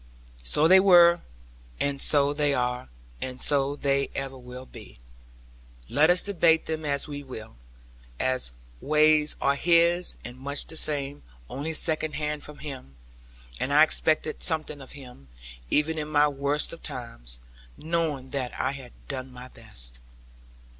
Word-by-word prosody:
So 105 Hz, -, +2 dB
they 190 Hz, +2 st, +7 dB
were, 175 Hz, -3 st, +6 dB, 0.6 s
and 140 Hz, -1 st, -1 dB
so 145 Hz, -1 st, +5 dB
they 145 Hz, -1 st, +1 dB
are; 125 Hz, -, -2 dB, 0.3 s
and 130 Hz, 0 st, -5 dB
so 140 Hz, -1 st, +3 dB
they 140 Hz, -1 st, 0 dB
ever 135 Hz, -1 st, -4 dB
will 125 Hz, 0 st, -10 dB
be. 110 Hz, -, -13 dB, 0.9 s
Let 150 Hz, +5 st, +3 dB
us 180 Hz, +1 st, +4 dB
debate 170 Hz, -5 st, +2 dB
them 155 Hz, -1 st, -4 dB
as 140 Hz, 0 st, 0 dB
we 145 Hz, -1 st, -6 dB
will, 120 Hz, -, -10 dB, 0.6 s
our 130 Hz, 0 st, 0 dB, 0.4 s
ways 155 Hz, 0 st, +3 dB
are 140 Hz, -, +2 dB
His, 170 Hz, +3 st, +3 dB
and 125 Hz, +1 st, -9 dB
much 140 Hz, +2 st, 0 dB
the -, -, -7 dB
same; 145 Hz, -2 st, -1 dB, 0.3 s
only 155 Hz, +4 st, -4 dB
second 155 Hz, -1 st, +2 dB
hand 150 Hz, -1 st, -3 dB
from 150 Hz, 0 st, -9 dB
Him. 130 Hz, -, -9 dB, 0.6 s
And 135 Hz, -, -2 dB
I 150 Hz, +2 st, +7 dB
expected 155 Hz, 0 st, +1 dB
something 155 Hz, -3 st, 0 dB
from 135 Hz, -, -11 dB
Him, 125 Hz, -, -13 dB, 0.4 s
even 160 Hz, -, +1 dB
in 150 Hz, -, -4 dB
my 150 Hz, -1 st, +3 dB
worst 145 Hz, +2 st, -1 dB
of 165 Hz, -, -11 dB
times, -, -, -6 dB, 0.4 s
knowing 155 Hz, -5 st, -2 dB
that 130 Hz, -3 st, -4 dB
I 130 Hz, -, 0 dB
had 135 Hz, -3 st, -10 dB
done 130 Hz, -1 st, -5 dB
my 125 Hz, 0 st, -11 dB
best. -, -, -6 dB
145 Hz, 150 wpm, -26 LUFS, 130-155 Hz, 0.9 s, they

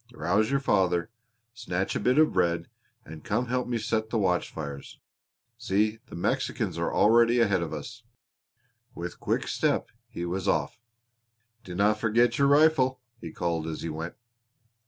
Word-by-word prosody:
Rouse 105 Hz, +5 st, +1 dB
your 140 Hz, 0 st, +2 dB
father, 95 Hz, -5 st, +1 dB, 0.4 s
snatch 95 Hz, -5 st, -3 dB
a -, -, 0 dB
bit 125 Hz, +2 st, +2 dB
of 155 Hz, 0 st, +4 dB
bread, 85 Hz, -2 st, +1 dB, 0.4 s
and 80 Hz, 0 st, -10 dB
come 110 Hz, +4 st, 0 dB
and 125 Hz, -, -9 dB
help 125 Hz, 0 st, 0 dB
me 120 Hz, -1 st, -1 dB
set 110 Hz, 0 st, -1 dB
the 115 Hz, -, -1 dB
watch 90 Hz, -4 st, +1 dB
fires. 70 Hz, -3 st, -7 dB, 0.6 s
See, 105 Hz, +3 st, 0 dB
the -, -, -10 dB
Mexicans 85 Hz, -, -1 dB
are -, -, -1 dB
already 115 Hz, +2 st, +4 dB
ahead 100 Hz, -6 st, +2 dB
of 85 Hz, -, -4 dB
us." 105 Hz, +11 st, -7 dB, 0.9 s
With -, -, -6 dB
quick -, -, -1 dB
step -, -, 0 dB, 0.2 s
he 85 Hz, -, -5 dB
was 95 Hz, +2 st, -3 dB
off. 105 Hz, -, 0 dB, 0.8 s
"Dinna 100 Hz, +4 st, +1 dB
forget 115 Hz, +3 st, +1 dB
your 140 Hz, -, +5 dB
rifle," 140 Hz, -3 st, +4 dB, 0.2 s
he 85 Hz, -5 st, -8 dB
called 85 Hz, -2 st, -2 dB
as 80 Hz, -, -5 dB
he 85 Hz, -, -3 dB
went. 80 Hz, +2 st, -5 dB
105 Hz, 160 wpm, -27 LUFS, 85-120 Hz, 0.9 s, your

